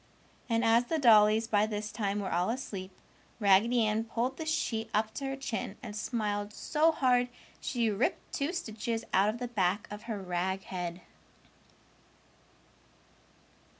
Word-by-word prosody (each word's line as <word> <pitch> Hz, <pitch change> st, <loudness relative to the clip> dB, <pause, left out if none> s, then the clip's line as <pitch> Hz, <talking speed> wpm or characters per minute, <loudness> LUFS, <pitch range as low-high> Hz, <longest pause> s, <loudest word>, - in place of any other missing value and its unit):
And 230 Hz, 0 st, +2 dB
as 230 Hz, +2 st, +4 dB
the 320 Hz, -, -1 dB
dollies 220 Hz, -4 st, +6 dB
by 210 Hz, -1 st, +2 dB
this 210 Hz, 0 st, -4 dB
time 205 Hz, -2 st, -1 dB
were 190 Hz, -, -3 dB
all 175 Hz, +3 st, +1 dB
asleep, 205 Hz, -6 st, -4 dB, 0.5 s
Raggedy 220 Hz, +3 st, +4 dB
Ann 215 Hz, +1 st, +1 dB
pulled 245 Hz, +3 st, -2 dB
the 320 Hz, -, -5 dB
sheet 235 Hz, -9 st, -1 dB
up 215 Hz, +1 st, +1 dB
to 275 Hz, -, -4 dB
her 270 Hz, -, -2 dB
chin 235 Hz, -6 st, -4 dB
and 210 Hz, -4 st, -7 dB
smiled 210 Hz, -2 st, -2 dB
so 315 Hz, +7 st, +2 dB
hard 250 Hz, -4 st, +2 dB, 0.3 s
she 235 Hz, -4 st, 0 dB
ripped 205 Hz, +5 st, -1 dB
two 285 Hz, +3 st, -1 dB
stitches 230 Hz, -, -3 dB
out 195 Hz, +2 st, +4 dB
of 220 Hz, -, -2 dB
the 245 Hz, 0 st, -4 dB
back 205 Hz, -2 st, 0 dB
of 210 Hz, 0 st, -6 dB
her 215 Hz, -3 st, -2 dB
rag 190 Hz, +1 st, -2 dB
head. 175 Hz, -1 st, -5 dB
220 Hz, 150 wpm, -31 LUFS, 205-245 Hz, 0.5 s, dollies